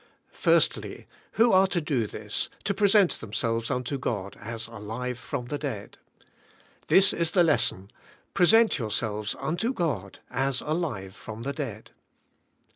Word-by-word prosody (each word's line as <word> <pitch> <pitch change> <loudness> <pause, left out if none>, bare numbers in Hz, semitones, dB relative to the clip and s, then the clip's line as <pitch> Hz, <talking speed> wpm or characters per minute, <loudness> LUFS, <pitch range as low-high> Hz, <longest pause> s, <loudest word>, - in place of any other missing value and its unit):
1. - - +2 0.3
Who 230 +1 +4
are 190 +1 +6
to 185 -2 0
do 140 -8 -1
this, 105 0 -3
— - - -29
to 200 - 0
present 200 -2 +4
themselves 115 +1 -2
unto 125 +2 -2
God 100 -6 -3
as 110 +1 -5
alive 115 +3 -5
from 120 +2 -4
the 145 +4 -4
dead? 120 -9 -5 0.9
This 195 0 +5
is 170 -1 +1
the 180 0 +4
les 155 -3 +4
son, 95 +2 -4 0.4
''Present 220 +1 +5
yourselves 105 -2 -2
unto 175 +10 -1
God 140 - -2
as 135 -1 0
alive 145 - -3
from 110 +1 -8
the 140 +2 -2
dead." 120 -9 -6
125 Hz, 145 wpm, -27 LUFS, 110-170 Hz, 0.9 s, are